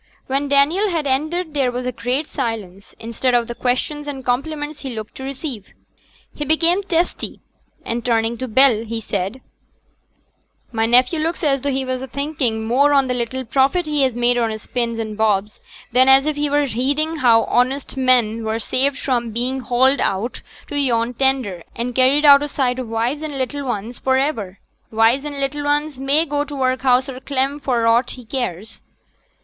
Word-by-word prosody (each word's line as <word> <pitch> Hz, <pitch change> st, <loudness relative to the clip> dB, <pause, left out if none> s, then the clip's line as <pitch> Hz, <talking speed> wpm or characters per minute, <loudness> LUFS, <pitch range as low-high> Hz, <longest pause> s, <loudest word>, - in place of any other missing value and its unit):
When 275 Hz, +2 st, -1 dB
Daniel 305 Hz, +9 st, +3 dB
had 330 Hz, -4 st, -1 dB
ended 310 Hz, +5 st, -1 dB
there 270 Hz, -4 st, +1 dB
was 250 Hz, +1 st, -4 dB
a 250 Hz, -, -1 dB
great 250 Hz, +5 st, -2 dB
silence, 220 Hz, -9 st, -5 dB
instead 235 Hz, +2 st, -1 dB
of 240 Hz, -1 st, +2 dB
the 240 Hz, -, -6 dB
questions 255 Hz, +5 st, -2 dB
and 270 Hz, -3 st, -6 dB
compliments 295 Hz, +4 st, -2 dB
he 265 Hz, -4 st, -6 dB
looked 215 Hz, -1 st, -7 dB
to 265 Hz, -, -7 dB
receive. 265 Hz, -, -6 dB, 0.6 s
He 295 Hz, -, -4 dB
became 330 Hz, +5 st, +2 dB
testy, 355 Hz, -3 st, -2 dB, 0.5 s
and 235 Hz, +1 st, -3 dB
turning 230 Hz, -1 st, +1 dB
to 260 Hz, -, -3 dB
Bell, 240 Hz, -1 st, +4 dB, 0.2 s
said, 200 Hz, +3 st, -4 dB, 1.3 s
'My 225 Hz, -1 st, 0 dB
nephew 250 Hz, +7 st, +3 dB
looks 330 Hz, +3 st, -2 dB
as 275 Hz, -3 st, +1 dB
though 285 Hz, -, -1 dB
he 265 Hz, -1 st, -1 dB
was 255 Hz, 0 st, -3 dB
a 265 Hz, -, -6 dB
thinking 265 Hz, -5 st, -2 dB
more 275 Hz, +6 st, +3 dB
on 275 Hz, -2 st, +4 dB
t' 250 Hz, -, 0 dB
little 250 Hz, +2 st, -3 dB
profit 275 Hz, +9 st, +2 dB
he 300 Hz, -2 st, 0 dB
has 260 Hz, -3 st, +1 dB
made 240 Hz, 0 st, +2 dB
on 230 Hz, -1 st, +1 dB
his 220 Hz, -1 st, -6 dB
pins 235 Hz, -2 st, -2 dB
an' 220 Hz, -1 st, -4 dB
bobs, 210 Hz, -1 st, 0 dB, 0.3 s
than 255 Hz, +2 st, +4 dB
as 270 Hz, +1 st, +6 dB
if 305 Hz, -1 st, 0 dB
he 295 Hz, 0 st, -1 dB
was 290 Hz, -2 st, +1 dB
heeding 290 Hz, +7 st, -1 dB
how 235 Hz, -5 st, +4 dB
honest 260 Hz, +3 st, 0 dB
men 245 Hz, -4 st, +2 dB
were 220 Hz, 0 st, -1 dB
saved 270 Hz, +4 st, 0 dB
from 245 Hz, -4 st, -1 dB
being 245 Hz, +4 st, -2 dB
haled 260 Hz, +3 st, +3 dB
out 205 Hz, +6 st, -1 dB, 0.2 s
to 290 Hz, -, -2 dB
yon 240 Hz, -3 st, +1 dB
tender, 255 Hz, -8 st, 0 dB
an' 245 Hz, +1 st, -3 dB
carried 265 Hz, +4 st, +3 dB
out 280 Hz, -1 st, +8 dB
o' 290 Hz, -, -2 dB
sight 260 Hz, -3 st, -1 dB
o' -, -, -2 dB
wives 230 Hz, +6 st, -2 dB
and 300 Hz, -3 st, -5 dB
little 270 Hz, +1 st, -3 dB
'uns 225 Hz, +2 st, -4 dB
for 260 Hz, 0 st, +2 dB
iver. 225 Hz, -9 st, -2 dB, 0.3 s
Wives 225 Hz, +5 st, +2 dB
an' 290 Hz, -1 st, -5 dB
little 290 Hz, +1 st, -2 dB
'uns 295 Hz, -1 st, 0 dB
may 280 Hz, +4 st, +2 dB
go 290 Hz, -1 st, -1 dB
t' 295 Hz, 0 st, -8 dB
workhouse 255 Hz, -1 st, +2 dB
or 260 Hz, -2 st, -7 dB
clem 275 Hz, +1 st, -1 dB
for 250 Hz, -5 st, 0 dB
aught 230 Hz, +2 st, +3 dB
he 250 Hz, -, -12 dB
cares. 220 Hz, -4 st, -5 dB
260 Hz, 190 wpm, -20 LUFS, 235-285 Hz, 1.3 s, out